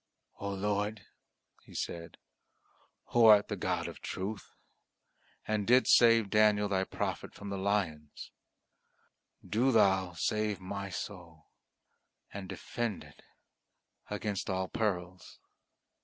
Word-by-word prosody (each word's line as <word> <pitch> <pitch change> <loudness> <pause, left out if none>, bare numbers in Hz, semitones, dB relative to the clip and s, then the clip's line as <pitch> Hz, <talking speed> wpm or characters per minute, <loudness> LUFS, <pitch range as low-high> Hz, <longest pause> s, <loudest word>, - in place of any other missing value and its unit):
"O 100 - -3
Lord," 105 +1 -2 0.6
he - - -16
said, 85 -1 -5 0.9
"Who 120 -1 +4
art 105 -1 +7
the - - -2
God - - -2
of - - -9
truth, 100 +3 -5 1.0
and 105 -2 -1
didst 125 +2 +6
save 115 -3 +5
Daniel 105 -1 +4
Thy 95 -1 0
prophet - - -4
from 100 - -8
the 100 - -3
lions, 95 -7 -2 1.2
do 125 +5 +2
Thou 95 -5 +3
save 105 +4 -1
my 100 +1 -5
soul 90 -4 -8 0.8
and 95 -2 -7
defend 115 -5 -4
it - - -17 0.9
against 105 -1 -3
all 95 0 -1
perils!" 90 -5 -3
100 Hz, 110 wpm, -31 LUFS, 95-105 Hz, 1.2 s, art